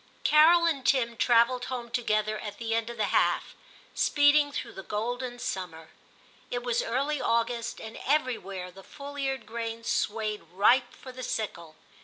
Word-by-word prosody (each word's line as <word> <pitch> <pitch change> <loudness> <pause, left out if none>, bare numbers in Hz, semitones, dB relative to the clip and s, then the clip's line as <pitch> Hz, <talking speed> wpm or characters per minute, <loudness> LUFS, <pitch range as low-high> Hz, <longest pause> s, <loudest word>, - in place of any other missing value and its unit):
Carol 330 +3 +6
and 295 -6 0
Tim 240 -3 +2
travelled 240 +2 +3
home 240 -2 -5
together 215 -3 0
at 205 -1 -7
the 225 -1 -3
end 230 0 0
of 235 - -7
the 210 -2 -1
half, - - +2 0.4
speeding 290 0 +4
through - - -5
the 195 - -7
golden 245 +5 -3
summer. 175 -8 -5 0.6
It 245 0 -3
was 240 -1 0
early 275 +5 -1
August, 230 0 0
and 220 0 -8
everywhere 210 -11 -1
the 195 +2 -13
full 285 +4 -10
eared 270 -4 -2
grain 230 +1 -5
swayed 215 -1 -1
ripe 245 +6 +4
for 260 - -11
the 255 0 -9
sickle. 170 -10 -4
235 Hz, 160 wpm, -28 LUFS, 215-260 Hz, 0.6 s, Carol